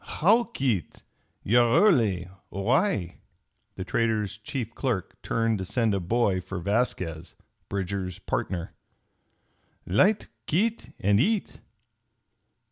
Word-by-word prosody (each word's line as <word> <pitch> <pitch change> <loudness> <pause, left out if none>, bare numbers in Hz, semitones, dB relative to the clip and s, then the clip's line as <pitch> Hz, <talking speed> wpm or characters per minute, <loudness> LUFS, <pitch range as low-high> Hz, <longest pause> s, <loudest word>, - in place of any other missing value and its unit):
"How, 220 +9 +3
Kit! 130 - -2 0.4
You're 120 +2 +4
early. 110 - +3 0.2
Why?" 105 - 0 0.6
The 95 - -4
trader's 110 -1 0
chief 115 +1 -5
clerk 120 -10 -3
turned 115 -2 0
to 95 - -3
send 115 +2 +1
a 100 - +1
boy 95 0 +1
for 95 +1 -6
Vasquez, 90 -4 -2 0.3
Bridger's 95 -2 -3
partner. 90 -3 -3 1.1
"Light, 195 - +3 0.2
Kit, 220 +8 0
and 100 +1 +3
eat." 205 - 0
110 Hz, 105 wpm, -27 LUFS, 95-130 Hz, 1.1 s, You're